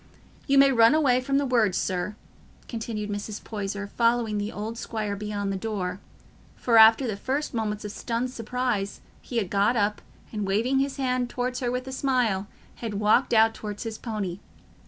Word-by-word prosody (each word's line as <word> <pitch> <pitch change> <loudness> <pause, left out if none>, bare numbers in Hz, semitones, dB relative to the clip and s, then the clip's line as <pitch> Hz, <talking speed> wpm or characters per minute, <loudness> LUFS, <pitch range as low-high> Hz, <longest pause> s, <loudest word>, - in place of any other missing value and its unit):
You 275 -1 +3
may 275 0 +7
run 230 +2 +6
away 260 -5 +3
from 275 +1 0
my 285 - +2
words, 235 -8 +2
sir," 185 +3 -2 0.5
continued 220 -3 -4
Mrs. 205 +1 -5
Poyser, 205 -1 -4
following 230 0 +1
the 205 +1 -3
old 215 +2 -5
squire 215 -3 -3
beyond 205 -1 -3
the - - -2
door—for 205 +3 -3
after 225 +4 +7
the 220 -4 -2
first 270 +9 -2
moments 210 -2 -2
of 210 - -4
stunned 235 +4 -2
surprise 235 -4 -2 0.2
he 240 - -5
had 200 -6 -1
got 205 +4 +3
up, 210 -1 0 0.3
and, 210 -2 -2
waving 230 +7 +2
his 275 0 -1
hand 255 -2 0
towards 250 0 -2
her 245 - -1
with 250 +1 -3
a - - -5
smile, 250 -8 0 0.3
had 225 -3 -5
walked 210 +5 +3
out 225 -1 +5
towards 210 0 -6
his 225 -2 -5
pony. 205 -6 -4
225 Hz, 180 wpm, -26 LUFS, 205-250 Hz, 0.5 s, may